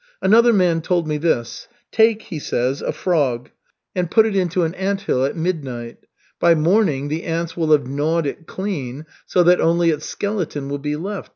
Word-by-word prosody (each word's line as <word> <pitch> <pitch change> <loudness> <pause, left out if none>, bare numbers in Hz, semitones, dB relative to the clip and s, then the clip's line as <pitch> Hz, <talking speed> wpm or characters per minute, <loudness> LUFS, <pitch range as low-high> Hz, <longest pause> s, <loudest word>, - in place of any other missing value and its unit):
Another 230 +4 +5
man 180 -6 +2
told 170 -1 0
me 150 -1 -1
this: 145 -7 -1 0.2
'Take,' 220 -1 +3
he 165 -6 -6
says, 130 0 -1
'a - - -1
frog, 145 -7 -1 0.4
and 180 -2 -1
put 220 +4 +5
it 215 -3 -1
into 180 -1 +1
an 165 0 -1
anthill 195 -8 -1
at 140 - -2
midnight. 135 -9 -3 0.4
By 170 -1 +5
morning 155 -4 +2
the 155 +2 -2
ants 165 0 -3
will 160 -2 0
have 145 -3 +4
gnawed 150 +5 0
it 150 +3 -5
clean, 155 -8 -5 0.2
so 180 - +3
that 180 +1 +4
only 170 0 +3
its 150 -1 -4
skeleton 180 -9 -3
will 145 0 -3
be 150 +1 -2
left. 195 +6 -5
165 Hz, 185 wpm, -20 LUFS, 145-185 Hz, 0.4 s, Another